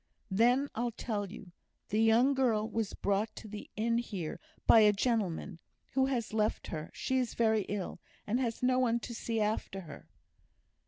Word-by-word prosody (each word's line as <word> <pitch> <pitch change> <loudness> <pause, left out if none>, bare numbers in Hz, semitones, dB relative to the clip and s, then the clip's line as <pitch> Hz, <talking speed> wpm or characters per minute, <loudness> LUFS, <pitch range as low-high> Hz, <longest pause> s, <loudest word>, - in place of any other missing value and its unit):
"Then 245 +7 +4
I'll 240 +2 -1
tell 205 -4 -3
you. 200 -4 -10 0.4
The 215 +2 +2
young 230 +5 +5
girl 230 -5 +2
was 225 -2 -2
brought 200 +2 0
to - - -9
the 210 0 -8
inn 230 +2 +1
here 195 -9 -4 0.3
by 225 - +8
a 210 -1 +7
gentleman, 200 -5 -1 0.3
who 265 0 +3
has 240 -5 -2
left 215 -1 0
her; 155 -1 -4
she 260 0 -1
is 250 -2 -2
very 220 -3 +2
ill, 200 -3 -3 0.3
and 230 +4 0
has 240 -2 -2
no 255 0 +3
one 235 -2 +2
to 240 - -6
see 225 0 -2
after 210 -2 -1
her." 155 -5 -11
220 Hz, 175 wpm, -32 LUFS, 205-240 Hz, 0.4 s, by